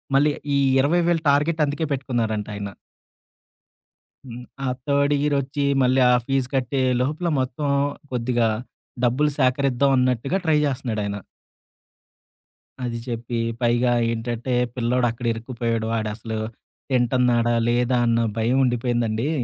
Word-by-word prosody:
మళ్ళీ 145 +2 +4 0.2
ఈ - - +3 0.2
20,000 170 +4 +2
టార్గెట్ 150 +3 +2
అందుకే 145 +3 -2
పెట్టుకున్నారంటాయన. 110 -6 -2 1.6
హ్మ్. 125 -1 -9 0.2
ఆ - - 0 0.2
థర్డ్ 140 0 +2
ఇయర్ 145 0 +1
ఒచ్చి, 140 +2 -3 0.2
మళ్ళీ 130 +1 +3
ఆ - - +5
ఫీజ్ 135 -2 0
కట్టే 130 +1 0 0.2
లోపల, 150 +7 -1
మొత్తం 130 +3 -2 0.4
కొద్దిగా 120 -2 +1 0.5
డబ్బులు 135 +5 +2
సేకరిద్దాం 135 +1 +2
అన్నట్టుగా 125 - +1
ట్రై 155 -1 +3
జేస్తున్నాడాయన. 110 -7 -2 1.7
అది 120 -1 -3
జెప్పి 120 -1 -4 0.2
పైగా 120 +1 +2 0.2
ఏంటంటే, 120 +2 -3 0.2
పిల్లోడు 125 0 +1
అక్కడ 120 +1 -8
ఇరుక్కుపోయాడు. 115 -1 -3
వాాడసలు 110 0 -3 0.5
తింటున్నాడా? 120 -1 +2
లేదా? 120 +1 +2
అన్న 115 0 +2
భయం 120 +4 +1
ఉండిపోయిందండి. 120 0 0
125 Hz, 110 wpm, -23 LUFS, 115-140 Hz, 1.7 s, ఆ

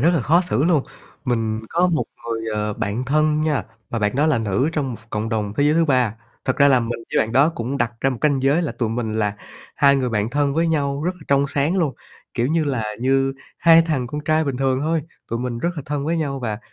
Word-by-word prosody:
rất 160 +6 +4
là 160 - +2
khó 165 +8 +4
xử 175 -5 0
luôn. 160 -5 +3 0.4
Mình 115 -3 -1
có 175 +2 +2
một 170 -3 0 0.2
người, 115 -1 -2
ờ, 105 0 -1
bạn 105 +6 -2
thân 155 +3 +2
nha 155 -3 0 0.3
và 115 - -1
bạn 105 +2 0
đó 150 +3 +3
là 150 -6 +2
nữ 110 +6 0
trong 145 -5 -1
một - - -4
ph 115 0 -17
cộng 105 +1 -2
đồng 105 -3 -2
thế - - +2
giới 150 +1 +3
thứ 165 0 +4
ba. 125 -7 +2 0.3
Thật 130 - 0
ra 140 -1 +6
là 130 -2 +5
mình 115 0 -3 0.2
với - - +4
bạn 110 - -7
đó 135 +5 +5
cũng 135 -4 -3
đặt 120 -3 0
ra 135 - +2
một 125 - -4
canh 140 -3 +2
giới 145 +6 +3
là 165 - -2
tụi 115 - -2
mình 110 -1 -2
là 105 -1 0 0.4
hai 140 0 +5
người 130 -2 0
bạn 105 0 0
thân 140 0 +1
với 165 +2 +2
nhau 140 -3 0
rất 180 - +2
là 180 - -20
trong 140 0 +3
sáng 145 +6 0
luôn, 155 -6 0 0.4
kiểu 120 -1 +1
như 160 +3 +1
là, 130 -6 -1 0.2
như 135 +1 +2 0.3
hai 165 -1 +7
thằng 135 -7 -1
con 150 +5 -5
trai 155 +1 +2
bình 135 -3 -2
thường 130 -1 +1
thôi, 160 +1 0 0.3
tụi 115 - -2
mình 120 -1 -3
rất 170 - 0
là 150 - -4
thân 145 -1 -2
với 170 - 0
nhau 140 -4 -2
và, 110 -3 -3
135 Hz, 265 wpm, -21 LUFS, 115-155 Hz, 0.4 s, hai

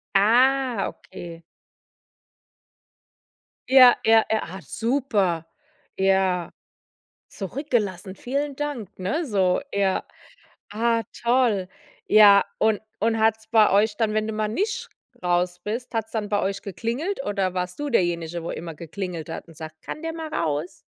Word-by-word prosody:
Ah, 245 +2 +3
okay. 170 -1 -11 2.3
Ja, 255 -2 +9
ja, 225 0 +6
ja, 220 - +2
ah, 190 +3 -8
super. 215 - 0 0.5
Ja. 190 -2 +1 0.8
Zurückgelassen, 200 - -3
vielen 280 +7 -3
Dank, 265 -8 -5
ne? 305 - -1
So, 190 -6 +2
ja. 195 -1 +1 0.6
Ah 230 +2 +1 0.2
toll, 235 -6 +2 0.4
ja, 205 -2 +7 0.2
und 220 -2 +2 0.2
und 225 +1 +1
hat's 220 0 +1
bei 220 -1 +5
euch 205 +2 +3
dann, 220 -2 +1
wenn 215 0 0
du - - -2
mal 215 0 -1
nicht 400 - -2 0.4
raus 180 0 0
bist, 230 +4 -4
hat's 225 -1 -2
dann 215 -2 -3
bei 205 - +1
euch 195 0 -2
geklingelt 240 - -3
oder 195 -3 -1
warst 180 0 -3
du 295 0 -2
derjenige, 170 - 0
wo 170 - -4
immer 165 -1 -6
geklingelt 170 0 -6
hat 165 - -7
und 165 -2 -16
sagt: 155 -1 -9
„Kann 305 - -7
der 325 0 -3
mal 320 -1 -6
raus?“ 155 0 -2
210 Hz, 140 wpm, -24 LUFS, 180-235 Hz, 2.3 s, Ja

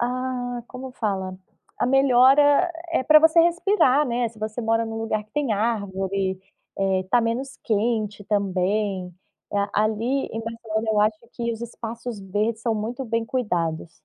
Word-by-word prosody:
ah, 245 0 -2
como 255 0 -8
fala? 190 -5 -3 0.4
A - - +1
melhora, 270 +5 +5 0.2
eh, 260 - +2
pra 305 +3 +7
você 320 +2 +5
respirar, 335 -5 +3
né. 240 -1 0
Se 220 -1 -18
você 215 +2 -4
mora 225 0 +1
em - - -6
um 225 - -5
lugar 215 -1 -2
que 215 - -35
tem 285 -6 0
árvore, 195 -3 -1 0.4
eh, 190 -1 +1
tá 245 - +5
menos 250 +4 -2
quente 215 -2 0
também, 195 -1 0 0.5
eh, 205 - +1
ali 220 +6 0
em 225 - -5
Barcelona 225 -1 -4
eu 210 -1 +2
acho 215 0 +2
que 235 -1 -3
os 225 - -7
espaços 230 -1 -6
verdes 210 +4 -2
são 230 -2 0
muito 235 +5 -4
bem 230 -1 -1
cuidados. 175 -10 -2
225 Hz, 160 wpm, -24 LUFS, 210-250 Hz, 0.5 s, pra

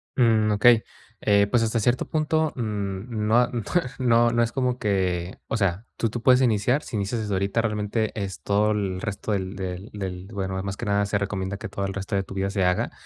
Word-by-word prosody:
Mm, 110 -4 +3
okey. 115 +2 +5 0.4
Eh, 100 -1 +4
pues, 120 0 +3
hasta 115 +1 0
cierto 120 +4 +1
punto, 155 0 +1
mm, 105 -1 -3
no 110 +2 +4
a 125 - +4
no 120 - -2 0.4
no 120 -2 +4
no 120 0 +3
es 115 - -1
como 125 -1 0
que 95 -5 -1
o 115 - -1
sea, 100 +1 0
tú 115 - 0
tú 120 - -4
puedes 125 +2 +5
iniciar, 125 +3 +2
si 115 - -7
inicias 105 +3 -1
desde 105 -2 -3
ahorita, 100 +4 +1
realmente 105 0 -1
es 100 -3 -4
todo 105 +1 +2
el 95 -3 -2
resto 105 0 -4
del 95 -1 -2
del 95 +1 -5
del 95 -2 -5
bueno, 95 -2 -3
ah, - - -2
más 100 0 -4
que - - -5
nada, 100 0 +2
se 100 0 +1
recomienda 100 -1 -3
que - - -7
todo 100 - -3
el 95 - -3
resto 100 +1 -3
de 95 - +2
tu 95 - -10
vida 95 0 0
se 100 -2 0
haga. 90 0 +1
105 Hz, 230 wpm, -25 LUFS, 95-115 Hz, 0.4 s, okey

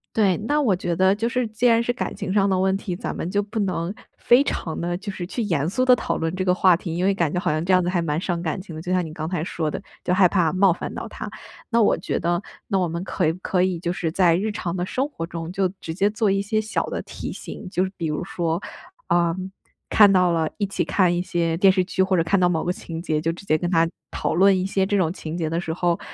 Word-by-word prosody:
对， 200 -5 +3
那 300 +1 +2
我 220 -9 +3
觉 175 -1 -2
得 190 +3 +4
就 225 +3 -1
是 250 0 0
既 220 +3 -2
然 230 -1 +5
是 235 - 0
感 245 - -4
情 - - -4
上 200 0 +3
的 190 -1 +1
问 190 0 +2
题， 190 -3 -4
咱 - - -5
们 170 - -3
就 205 +1 +2
不 210 +3 -7
能， 185 -3 -1 0.3
非 245 +3 +5
常 165 - -3
地 175 +1 -2
就 200 +1 -5
是 180 -2 -5
去 220 +7 -4
严 165 -9 0
肃 255 +9 0
地 255 -1 +6
讨 - - -2
论 165 0 -2
这 185 0 -2
个 180 - +4
话 185 -1 +5
题， 165 -2 -5
因 175 - -1
为 195 +1 +3
感 170 -5 0
觉 180 - 0
好 - - -1
像 155 +2 0
这 185 - +2
样 185 - +5
子 175 - -1
还 180 -1 +1
蛮 160 -1 -1
伤 175 -3 -1
感 165 +2 -2
情 180 -4 -10
的， 155 - -6
就 175 - -4
像 180 -1 +2
你 160 - -7
刚 155 0 -5
才 170 -2 -2
说 160 -3 -2
的， - - -5 0.2
就 180 - +1
害 185 0 +6
怕 175 -4 +2
冒 190 0 +4
犯 170 - -4
到 - - -5
他。 - - -7 0.4
那 235 0 +4
我 210 - +4
觉 - - -2
得， 175 0 0 0.3
那 195 - +1
我 185 -2 +1
们 170 +2 -4
可 170 -4 0
可 180 -1 +1
以 185 -2 0
就 175 0 -2
是 170 -2 -2
在 170 -1 +4
日 210 +5 -1
常 175 -4 -3
的 180 -1 -1
生 265 +9 -1
活 165 - -5
中 165 0 -6
就 190 0 +1
直 160 - -5
接 195 +3 +2
做 215 -1 +1
一 195 0 +2
些 215 +2 0
小 215 +1 -2
的 - - -4
提 - - -7
醒， - - -8
就 185 -2 +1
是 190 - -3
比 170 - -3
如 150 +2 -2
说， 170 -1 -2 0.5
呃 170 -1 +2 0.5
看 205 -2 +7
到 180 -2 +4
了 160 -2 +1
一 205 - 0
起 195 - -1
看 180 -3 +2
一 175 - 0
些 170 -2 -1
电 190 +2 +6
视， 185 -1 +2 0.2
或 190 -1 +1
者 165 - +3
看 195 +4 +2
到 180 -1 +4
某 165 -2 0
个 180 - 0
情 165 -2 -7
节， 155 -3 -1
就 165 +1 0
直 175 +4 -10
接 155 - +2
跟 175 - -1
他， 165 -2 +3 0.2
讨 - - -2
论 190 +3 +5
一 185 - -1
些 195 0 0
这 205 - +1
种 170 -3 +1
情 165 -3 -6
节 165 -2 -1
的 165 +2 -1
时 165 - -4
候， 170 0 0
180 Hz, 310 characters per minute, -23 LUFS, 170-195 Hz, 0.5 s, 看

